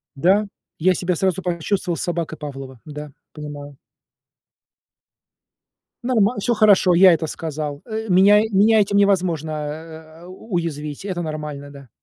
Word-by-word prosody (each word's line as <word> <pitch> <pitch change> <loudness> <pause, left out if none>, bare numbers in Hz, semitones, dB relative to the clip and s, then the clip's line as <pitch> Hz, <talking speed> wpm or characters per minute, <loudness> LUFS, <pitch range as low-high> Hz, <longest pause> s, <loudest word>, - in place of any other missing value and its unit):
Да, 195 +8 +2 0.3
я 185 +3 +3
себя 180 0 -1
сразу 190 +1 0
почувствовал 180 0 -2
собакой 170 -2 -3
Павлова. 135 -4 -8
Да, 150 -1 -8 0.2
понимаю. 145 -2 -9 2.3
Нормал 235 -2 +2
всё 240 +4 0
хорошо, 205 -4 +4
я 185 +1 +7
это 160 -1 -1
сказал, 150 -2 -5
э. 220 -1 -5
Меня 200 +3 +6 0.4
этим 200 0 +1
невозможно, 180 -6 +1
э, 160 +2 -8
уязвить. 170 -6 -5
Это 185 -3 -3
нормально, 150 -3 -6
да. 140 -3 -14
170 Hz, 120 wpm, -21 LUFS, 150-190 Hz, 2.3 s, я